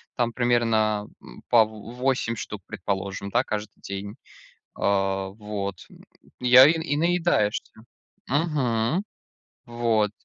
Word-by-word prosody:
Там 120 Hz, -1 st, 0 dB
примерно, 110 Hz, -4 st, +1 dB
э, -, -, -17 dB, 0.2 s
по 115 Hz, -2 st, +6 dB
в 110 Hz, +2 st, -11 dB
восемь 125 Hz, -2 st, 0 dB
штук, 105 Hz, -2 st, -6 dB
предположим, 100 Hz, +1 st, -4 dB
да, -, -, +2 dB
каждый 105 Hz, -1 st, -5 dB
день. 100 Hz, +2 st, -6 dB, 0.6 s
А 95 Hz, -1 st, 0 dB
вот. 100 Hz, -2 st, -6 dB, 0.5 s
И 125 Hz, -, -1 dB
я, 130 Hz, +2 st, +10 dB
и 155 Hz, -, +5 dB
и 155 Hz, -3 st, -1 dB
наедаешься. 170 Hz, -10 st, +1 dB, 0.6 s
Мгм. 140 Hz, -, 0 dB, 0.6 s
Вот. 115 Hz, -3 st, +1 dB
110 Hz, 115 wpm, -25 LUFS, 100-125 Hz, 0.6 s, я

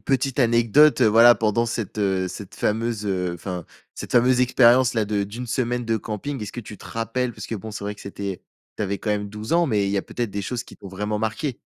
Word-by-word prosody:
petite 135 Hz, -1 st, -1 dB
anecdote, 120 Hz, +5 st, +5 dB
voilà, 115 Hz, +2 st, +7 dB
pendant 115 Hz, +1 st, +1 dB
cette, 115 Hz, -2 st, -4 dB
heu, 95 Hz, -2 st, +1 dB
cette 95 Hz, +2 st, -8 dB
fameuse, 110 Hz, 0 st, -1 dB
heu, 90 Hz, -3 st, -1 dB
enfin, 90 Hz, -1 st, -6 dB, 0.3 s
cette -, -, -7 dB
fameuse 125 Hz, +1 st, +4 dB
expérience-là, 125 Hz, -2 st, +4 dB
de 105 Hz, -1 st, -1 dB
d'une 115 Hz, +5 st, -7 dB
semaine 120 Hz, +1 st, -1 dB
de 115 Hz, -1 st, 0 dB
camping. 115 Hz, +6 st, -5 dB
Est-ce 100 Hz, -, -6 dB
que 120 Hz, -, -5 dB
tu 105 Hz, -2 st, -11 dB
te -, -, -12 dB
rappelles, 120 Hz, +2 st, -2 dB
parce -, -, -8 dB
que -, -, -4 dB
bon, 110 Hz, +1 st, -6 dB
c'est 105 Hz, -1 st, -6 dB
vrai 105 Hz, 0 st, -3 dB
que -, -, -16 dB
c'était 100 Hz, -1 st, -5 dB, 0.4 s
tu -, -, -1 dB
avais 100 Hz, 0 st, -1 dB
quand 105 Hz, -, -3 dB
même 105 Hz, -1 st, -1 dB
12 105 Hz, +4 st, -6 dB
ans, 170 Hz, 0 st, +4 dB
mais 105 Hz, -7 st, +1 dB
il -, -, -1 dB
y 100 Hz, -, +1 dB
a -, -, -2 dB
peut-être 120 Hz, -3 st, -4 dB
des 100 Hz, -, -3 dB
choses 120 Hz, +4 st, -3 dB
qui -, -, -14 dB
t'ont 100 Hz, -, -11 dB
vraiment 105 Hz, +3 st, -3 dB
marqué? 115 Hz, +5 st, -2 dB
110 Hz, 240 wpm, -23 LUFS, 100-120 Hz, 0.4 s, voilà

